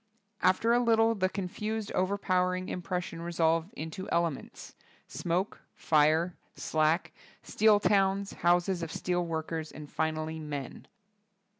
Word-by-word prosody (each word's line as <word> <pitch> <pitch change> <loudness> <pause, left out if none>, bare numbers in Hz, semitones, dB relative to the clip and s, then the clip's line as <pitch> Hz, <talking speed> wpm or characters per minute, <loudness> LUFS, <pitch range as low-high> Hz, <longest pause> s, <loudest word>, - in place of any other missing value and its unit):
After 190 +6 +3
a 240 - +4
little 225 -1 +4
the 185 -3 0
confused, 210 +3 -4
overpowering 185 -1 0
im 180 - -4
pression 175 -2 -4
resolve^ 165 +1 0
into 185 -2 -6
elements: 170 -4 -2 0.3
smoke, 180 +4 -2
fire, 160 +3 +3 0.2
slack, 155 +2 +1 0.3
steel 215 -1 +4
towns, 195 -1 +2
houses 175 +1 +2
of 165 -1 -4
steel 180 -1 -1
workers, 160 -1 -4
and 150 -1 -9
finally 160 0 -2
men. 145 -4 -6
175 Hz, 120 wpm, -30 LUFS, 160-195 Hz, 0.3 s, a